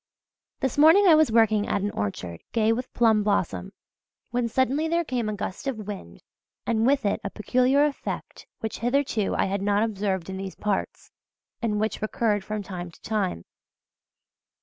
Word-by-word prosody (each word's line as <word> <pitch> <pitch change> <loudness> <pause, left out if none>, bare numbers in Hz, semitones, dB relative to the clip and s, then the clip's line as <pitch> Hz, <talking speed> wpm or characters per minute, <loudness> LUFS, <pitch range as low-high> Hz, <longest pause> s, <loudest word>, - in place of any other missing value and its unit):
This 265 +1 -1
morning 325 +7 +7
I 350 - +8
was 310 -5 +5
working 220 -2 +3
at 200 - 0
an 205 - -1
orchard 90 -4 -4
gay 225 -1 +3
with 250 +2 -4
plum 225 -3 +3
blossom, 185 - -1 0.6
when 245 0 0
suddenly 265 +6 +1
there 335 +1 +1
came 245 -7 -2
a 210 - -2
gust 200 +4 -5
of 220 -6 -3
wind 85 - -8 0.4
and 225 0 +1
with 275 -3 +2
it 200 - 0
a 200 - -3
peculiar 255 +7 +2
effect 295 -2 -5
which 220 - -4
hitherto 245 -4 0
I - - +2
had 195 0 -2
not 205 +1 +2
observed 195 -5 -2
in 190 0 -5
these 190 0 -6
parts, 205 -2 -3 0.5
and 215 -3 0
which 220 +1 -1
recurred 215 -1 0
from 210 +1 -4
time 180 -2 -6
to 170 - -19
time. 195 - -2
215 Hz, 170 wpm, -25 LUFS, 200-250 Hz, 0.6 s, I